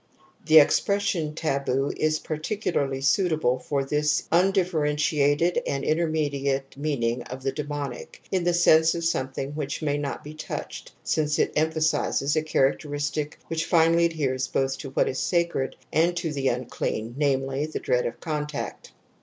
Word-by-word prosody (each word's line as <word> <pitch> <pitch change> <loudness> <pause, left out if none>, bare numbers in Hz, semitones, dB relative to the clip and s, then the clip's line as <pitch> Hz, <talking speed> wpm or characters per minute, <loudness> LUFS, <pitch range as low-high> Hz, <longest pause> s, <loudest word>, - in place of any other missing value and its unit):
(^ - - -21
The 160 0 +7
expression 165 0 +3
taboo 140 -3 0
is 155 0 +1
particularly 155 -4 -2
suitable 155 -4 +2
for 140 +2 -1
this 150 +1 +1
undifferentiated 165 -3 +2
and 140 0 -2
intermediate 145 -4 0
meaning 125 -5 -1
of 130 +1 -8
the 135 - 0
demonic, 145 -4 -5
in 185 -2 +1
the 175 0 +2
sense 160 -1 +5
of 170 - -3
some 130 -5 0
thing 135 +1 -4
which 150 0 -4
may 145 -1 0
not 145 -1 -4
be 150 - -8
touched, 155 - -6
since 150 -1 0
it - - +1
empha 160 +1 +1
sizes 145 -2 +1
a 155 - +2
characteristic 145 0 -1
which 165 0 -2
finally 165 0 +4
adheres 135 -6 -1
both 135 0 0
to 140 - -6
what 130 - +1
is 130 - -2
sacred 170 -2 0 0.2
and 170 +3 +2
to 165 -3 -2
the 135 -2 -1
unclean, 120 -2 -2
namely, 135 0 0
the 155 - -4
dread 125 0 +1
of 115 - -7
contact. 150 -2 -4
150 Hz, 155 wpm, -25 LUFS, 135-160 Hz, 0.2 s, The